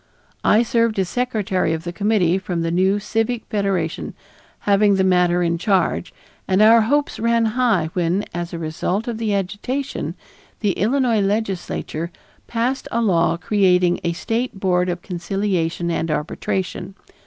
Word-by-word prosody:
I 220 Hz, +3 st, +4 dB
served 230 Hz, -2 st, +1 dB
as 190 Hz, -2 st, 0 dB
secretary 210 Hz, -9 st, 0 dB
of 160 Hz, 0 st, -4 dB
the 175 Hz, -1 st, -5 dB
committee 195 Hz, -3 st, +2 dB
from 180 Hz, -3 st, -3 dB
the 165 Hz, -, -1 dB
new 190 Hz, +3 st, +2 dB
Civic 225 Hz, +3 st, -1 dB
Federation 195 Hz, -6 st, -2 dB, 0.5 s
having 205 Hz, 0 st, +3 dB
the 190 Hz, -, +2 dB
matter 180 Hz, -1 st, +3 dB
in 170 Hz, 0 st, 0 dB
charge, 190 Hz, -3 st, +1 dB, 0.4 s
and 190 Hz, 0 st, +2 dB
our 225 Hz, +2 st, +7 dB
hopes 285 Hz, +6 st, 0 dB
ran 230 Hz, 0 st, +2 dB
high 220 Hz, -11 st, +1 dB
when, 180 Hz, +3 st, 0 dB
as 175 Hz, 0 st, -4 dB
a 170 Hz, -, -5 dB
result 175 Hz, +7 st, -2 dB
of 230 Hz, -2 st, -3 dB
the 215 Hz, -3 st, 0 dB
agitation, 210 Hz, +9 st, -3 dB, 0.5 s
the 205 Hz, -3 st, +2 dB
Illinois 230 Hz, +2 st, +1 dB
legislature 195 Hz, -5 st, -2 dB, 0.4 s
passed 245 Hz, +3 st, -1 dB
a 235 Hz, -, 0 dB
law 170 Hz, -6 st, +2 dB
creating 180 Hz, -2 st, +2 dB
a 170 Hz, -1 st, 0 dB
State 225 Hz, +4 st, -3 dB
Board 180 Hz, -1 st, +1 dB
of 175 Hz, 0 st, -4 dB
Conciliation 175 Hz, -2 st, -2 dB
and 165 Hz, 0 st, -1 dB
Arbitration. 180 Hz, +5 st, -3 dB
195 Hz, 150 wpm, -21 LUFS, 175-220 Hz, 0.5 s, our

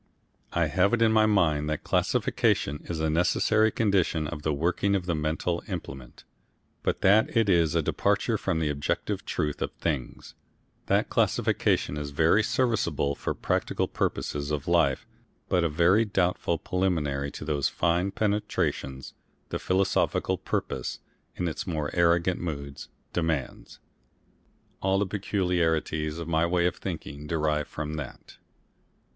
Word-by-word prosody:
I -, -, +2 dB
have 95 Hz, +5 st, +2 dB
it 115 Hz, -, -4 dB
in 110 Hz, -, +4 dB
my 110 Hz, -1 st, +4 dB
mind 80 Hz, -8 st, +2 dB
that 75 Hz, -, -2 dB
classification 75 Hz, +1 st, +1 dB
is 85 Hz, -2 st, -3 dB
a 80 Hz, -, +1 dB
necessary 105 Hz, +7 st, +3 dB
condition 95 Hz, -8 st, +1 dB
of 75 Hz, 0 st, -5 dB
the 75 Hz, -, 0 dB
working 90 Hz, +6 st, +1 dB
of 95 Hz, -2 st, -1 dB
the 85 Hz, -, 0 dB
mental 80 Hz, +3 st, -1 dB
implement, 65 Hz, -1 st, -7 dB, 0.6 s
but -, -, -1 dB
that 105 Hz, +4 st, +4 dB
it 115 Hz, -2 st, +4 dB
is 85 Hz, -5 st, +3 dB
a -, -, +2 dB
departure -, -, +1 dB
from -, -, -1 dB
the 80 Hz, -2 st, 0 dB
objective 70 Hz, 0 st, -2 dB
truth 75 Hz, -1 st, -2 dB
of -, -, -1 dB
things, 70 Hz, -7 st, -4 dB, 0.5 s
that -, -, +1 dB
classification 75 Hz, -, +1 dB
is 75 Hz, -1 st, -4 dB
very 80 Hz, +8 st, +3 dB
serviceable 105 Hz, -, 0 dB
for -, -, -3 dB
the -, -, -28 dB
practical -, -, 0 dB
purposes 70 Hz, 0 st, -2 dB
of 75 Hz, +1 st, -3 dB
life 85 Hz, -6 st, +2 dB, 0.4 s
but 90 Hz, -2 st, +2 dB
a 85 Hz, -, +2 dB
very 85 Hz, +8 st, +4 dB
doubtful 90 Hz, -4 st, 0 dB
preliminary 75 Hz, -7 st, -1 dB
to 75 Hz, -, -8 dB
those 75 Hz, -3 st, 0 dB
fine 85 Hz, +3 st, +1 dB
penetrations 100 Hz, -11 st, -2 dB, 0.4 s
the -, -, -3 dB
philosophical 95 Hz, +1 st, +1 dB
purpose, -, -, -3 dB, 0.4 s
in 90 Hz, -, -2 dB
its 80 Hz, -, -4 dB
more 75 Hz, -4 st, -2 dB
arrogant 85 Hz, +1 st, +2 dB
moods, 70 Hz, -6 st, -6 dB, 0.2 s
demands. 80 Hz, -5 st, -2 dB, 1.0 s
All 95 Hz, 0 st, +2 dB
the 100 Hz, -, +1 dB
peculiarities 85 Hz, -6 st, 0 dB
of 85 Hz, -1 st, -5 dB
my 85 Hz, 0 st, +2 dB
way 85 Hz, 0 st, +1 dB
of 90 Hz, -, 0 dB
thinking 75 Hz, +1 st, -6 dB
derive 75 Hz, -2 st, 0 dB
from 75 Hz, 0 st, -5 dB
that. 75 Hz, -4 st, -8 dB
85 Hz, 145 wpm, -27 LUFS, 75-95 Hz, 1.0 s, in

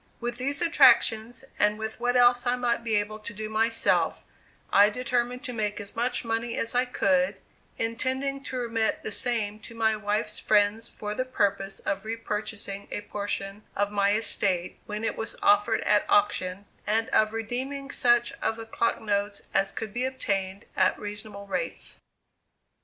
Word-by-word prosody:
With 240 Hz, 0 st, -3 dB
these 280 Hz, +5 st, 0 dB
attractions, 255 Hz, -6 st, +4 dB
and 210 Hz, 0 st, +3 dB
with 220 Hz, 0 st, -5 dB
what 245 Hz, +1 st, +1 dB
else 245 Hz, 0 st, +5 dB
I 245 Hz, -, +3 dB
might 240 Hz, -1 st, 0 dB
be 225 Hz, -2 st, 0 dB
able 210 Hz, +1 st, -1 dB
to 215 Hz, +1 st, -5 dB
do 215 Hz, 0 st, -5 dB
myself, 225 Hz, +1 st, +1 dB, 0.5 s
I 205 Hz, +1 st, +7 dB
determined 250 Hz, +2 st, -1 dB
to 250 Hz, -4 st, -4 dB
make 210 Hz, -2 st, -2 dB
as 200 Hz, -1 st, -8 dB
much 240 Hz, +1 st, 0 dB
money 230 Hz, +1 st, -2 dB
as 230 Hz, -, 0 dB
I 250 Hz, +1 st, +3 dB
could, 190 Hz, -5 st, +1 dB, 0.4 s
intending 260 Hz, +4 st, -1 dB
to 260 Hz, -, -4 dB
remit 230 Hz, -2 st, 0 dB
the -, -, -3 dB
same 215 Hz, -3 st, +1 dB
to 230 Hz, -, -12 dB
my 220 Hz, -1 st, +2 dB
wife's 210 Hz, 0 st, -2 dB
friends, 210 Hz, +2 st, +2 dB
for 210 Hz, 0 st, -5 dB
the 255 Hz, -, -1 dB
purpose 200 Hz, -6 st, -1 dB
of 195 Hz, 0 st, -2 dB
repurchasing 215 Hz, -2 st, -4 dB
a -, -, -3 dB
portion 200 Hz, 0 st, -4 dB
of 205 Hz, 0 st, 0 dB
my 200 Hz, 0 st, +2 dB
estate, 195 Hz, -5 st, 0 dB
when 210 Hz, +1 st, -4 dB
it 225 Hz, -, -1 dB
was 225 Hz, 0 st, -4 dB
offered 205 Hz, +2 st, +4 dB
at 210 Hz, 0 st, +3 dB
auction, 200 Hz, -2 st, +2 dB, 0.2 s
and 225 Hz, +2 st, +2 dB
of 215 Hz, 0 st, +3 dB
redeeming 260 Hz, +5 st, -4 dB
such 240 Hz, -1 st, +3 dB
of 225 Hz, -, 0 dB
the 225 Hz, 0 st, -8 dB
clock 230 Hz, +1 st, 0 dB
notes 205 Hz, -1 st, -1 dB
as 195 Hz, 0 st, +2 dB
could 215 Hz, -3 st, -6 dB
be 245 Hz, -, -1 dB
obtained 200 Hz, -7 st, -2 dB
at 190 Hz, -1 st, +3 dB
reasonable 205 Hz, -1 st, -6 dB
rates. -, -, -4 dB
220 Hz, 170 wpm, -27 LUFS, 205-240 Hz, 0.5 s, I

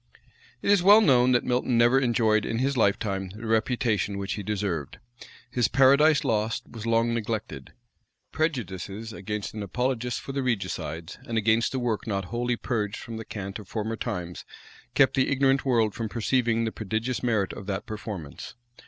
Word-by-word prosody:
It -, -, +3 dB
is 200 Hz, -3 st, +5 dB
well 205 Hz, +4 st, +8 dB
known, 130 Hz, -, +4 dB
that 120 Hz, -, +3 dB
Milton 125 Hz, -1 st, +1 dB
never 120 Hz, +3 st, +5 dB
enjoyed 115 Hz, -4 st, +2 dB
in 115 Hz, -, -2 dB
his 135 Hz, +3 st, 0 dB
lifetime 100 Hz, -3 st, 0 dB
the 110 Hz, +2 st, -8 dB
reputation 110 Hz, -2 st, 0 dB
which 100 Hz, 0 st, -3 dB
he 105 Hz, -, -4 dB
deserved. 95 Hz, -7 st, -3 dB, 0.5 s
His 125 Hz, -2 st, +2 dB
Paradise 140 Hz, +3 st, +5 dB
Lost 110 Hz, 0 st, 0 dB
was 115 Hz, -1 st, -8 dB
long 115 Hz, +1 st, +2 dB
neglected: 110 Hz, -1 st, -4 dB, 0.6 s
prejudices 110 Hz, -, -3 dB
against 105 Hz, 0 st, -5 dB
an 110 Hz, -, -5 dB
apologist 125 Hz, +4 st, -1 dB
for -, -, -7 dB
the 135 Hz, 0 st, -2 dB
regicides, 90 Hz, -, -3 dB
and 115 Hz, -, -2 dB
against 110 Hz, +3 st, +2 dB
a -, -, 0 dB
work 120 Hz, -2 st, -2 dB
not 100 Hz, -3 st, -1 dB
wholly 120 Hz, +1 st, 0 dB
purged 105 Hz, -5 st, -2 dB
from 115 Hz, -1 st, -7 dB
the 110 Hz, -, -7 dB
cant 100 Hz, 0 st, -6 dB
of 105 Hz, -, -11 dB
former 110 Hz, +2 st, -3 dB
times, 90 Hz, -7 st, -5 dB, 0.5 s
kept 135 Hz, -, +5 dB
the 130 Hz, -, +2 dB
ignorant 135 Hz, 0 st, +2 dB
world 115 Hz, -5 st, +2 dB
from 115 Hz, -2 st, -4 dB
perceiving 115 Hz, 0 st, +1 dB
the 110 Hz, -, -2 dB
prodigious 110 Hz, +4 st, -3 dB
merit 110 Hz, -6 st, 0 dB
of 100 Hz, -, -9 dB
that 95 Hz, -2 st, -3 dB
performance. 105 Hz, -8 st, -7 dB
115 Hz, 170 wpm, -26 LUFS, 105-125 Hz, 0.6 s, well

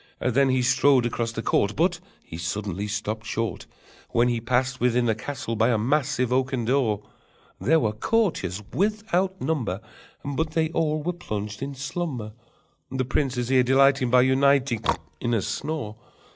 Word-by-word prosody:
Then 135 Hz, +2 st, +2 dB
he 130 Hz, -1 st, +2 dB
strode 130 Hz, 0 st, +4 dB
across 115 Hz, -1 st, -1 dB
the 115 Hz, 0 st, -5 dB
court, 100 Hz, +1 st, +1 dB
But 175 Hz, +1 st, +1 dB, 0.2 s
he -, -, -10 dB
suddenly 100 Hz, +3 st, -3 dB
stopped 110 Hz, +1 st, -3 dB
short 115 Hz, 0 st, -3 dB, 0.4 s
When 120 Hz, +1 st, +3 dB
he 120 Hz, -1 st, -1 dB
passed 125 Hz, +2 st, 0 dB
within 125 Hz, 0 st, +2 dB
the 115 Hz, -, +3 dB
castle 115 Hz, +1 st, -5 dB
by 115 Hz, +2 st, +3 dB
a 115 Hz, -, +3 dB
massive 130 Hz, +1 st, +1 dB
oaken 130 Hz, -2 st, 0 dB
door: 115 Hz, -5 st, +1 dB, 0.6 s
There 160 Hz, +4 st, +3 dB
were 110 Hz, -7 st, +1 dB
courtiers 105 Hz, -, 0 dB
without 195 Hz, -2 st, 0 dB
number, 120 Hz, -, -1 dB, 0.5 s
But 155 Hz, +3 st, -2 dB
they 160 Hz, -1 st, +1 dB
all 155 Hz, -2 st, 0 dB
were 175 Hz, +3 st, -1 dB
plunged 105 Hz, -11 st, -5 dB
in 140 Hz, 0 st, -4 dB
slumber, 135 Hz, -5 st, -4 dB, 0.6 s
The 130 Hz, 0 st, -2 dB
prince's 130 Hz, -2 st, -1 dB
ear 130 Hz, -1 st, +5 dB
delighting 135 Hz, 0 st, +4 dB
By 125 Hz, +1 st, +6 dB
uniting 130 Hz, -3 st, +3 dB, 0.4 s
In 120 Hz, 0 st, 0 dB
a 110 Hz, -, +1 dB
snore. 145 Hz, -9 st, -4 dB
130 Hz, 160 wpm, -25 LUFS, 115-145 Hz, 0.6 s, By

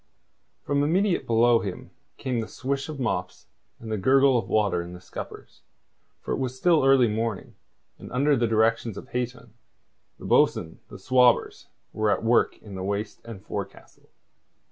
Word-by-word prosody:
From 140 Hz, 0 st, 0 dB
immediately 180 Hz, +6 st, +1 dB
below 115 Hz, +1 st, +4 dB
him 105 Hz, +6 st, -7 dB, 0.3 s
came 130 Hz, -3 st, -2 dB
the 110 Hz, -, -3 dB
swish 135 Hz, +2 st, -4 dB
of 150 Hz, -3 st, -6 dB
mops 90 Hz, -7 st, -3 dB, 0.3 s
and 110 Hz, -1 st, -8 dB
the 110 Hz, -, -1 dB
gurgle 135 Hz, +4 st, +4 dB
of 120 Hz, -, -1 dB
water 105 Hz, -5 st, +1 dB
in 85 Hz, +1 st, -8 dB
the 90 Hz, -, -10 dB
scuppers, 90 Hz, -, -10 dB, 0.6 s
for -, -, -6 dB
it -, -, -1 dB
was 130 Hz, -1 st, -3 dB
still 165 Hz, 0 st, +3 dB
early 135 Hz, -2 st, +5 dB
morning, 110 Hz, -1 st, -3 dB, 0.5 s
and -, -, -11 dB
under 140 Hz, +4 st, +2 dB
the 120 Hz, -2 st, +1 dB
directions 110 Hz, -1 st, +1 dB
of -, -, -10 dB
Hayton, 125 Hz, -2 st, -5 dB, 0.6 s
the -, -, -11 dB
bo'sun, 80 Hz, -, +2 dB
the -, -, -11 dB
swabbers 125 Hz, -2 st, +2 dB, 0.3 s
were 110 Hz, 0 st, 0 dB
at 100 Hz, -, 0 dB
work 115 Hz, +1 st, +2 dB
in 105 Hz, -, -11 dB
the 95 Hz, -, -6 dB
waist 100 Hz, +2 st, -3 dB
and 110 Hz, -4 st, -10 dB
forecastle. -, -, -8 dB
115 Hz, 165 wpm, -25 LUFS, 110-130 Hz, 0.6 s, early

